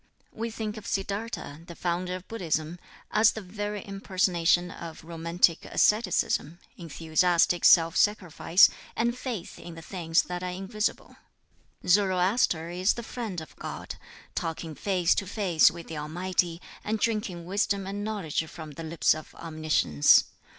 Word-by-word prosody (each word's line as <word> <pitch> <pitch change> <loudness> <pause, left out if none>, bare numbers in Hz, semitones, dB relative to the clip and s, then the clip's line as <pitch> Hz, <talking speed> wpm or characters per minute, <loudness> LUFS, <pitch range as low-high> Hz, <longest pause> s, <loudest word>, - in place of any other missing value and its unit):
We 230 +1 -3
think 220 -1 -5
of 215 - -9
Siddartha, 195 -6 -4
the 170 - -9
founder 180 +1 -2
of 185 0 -9
Buddhism, 170 -5 -2 0.3
as 220 +2 +5
the 220 - -6
very 205 +1 -5
impersonation 180 -3 +1
of 165 -3 -9
romantic 170 +1 +1
asceticism, 185 -6 +1 0.2
enthusiastic 170 +1 +1
self 165 -2 +6
sacrifice, 185 -3 +4 0.3
and 235 +1 0
faith 245 -8 -6
in 170 0 -9
the 165 - -10
things 165 -3 +1
that 180 0 -5
are 180 - -3
invisible. 195 +4 -3 0.7
Zoroaster 185 -2 +2
is 185 +3 +2
the 235 - -7
friend 220 -7 -5
of 160 - -12
God, - - -6 0.4
talking 165 -1 -4
face 180 0 +1
to 195 - -2
face 185 -6 +4
with 170 0 -9
the 160 -2 -6
Almighty, 170 +2 -1 0.2
and 215 +1 -1
drinking 210 -6 -2
wisdom 200 +1 0
and 200 +1 -4
knowledge 200 -8 -2
from 160 -1 -9
the 155 +3 -8
lips 160 0 +2
of 155 0 -10
Omniscience. 155 - +3
180 Hz, 145 wpm, -27 LUFS, 165-205 Hz, 0.7 s, self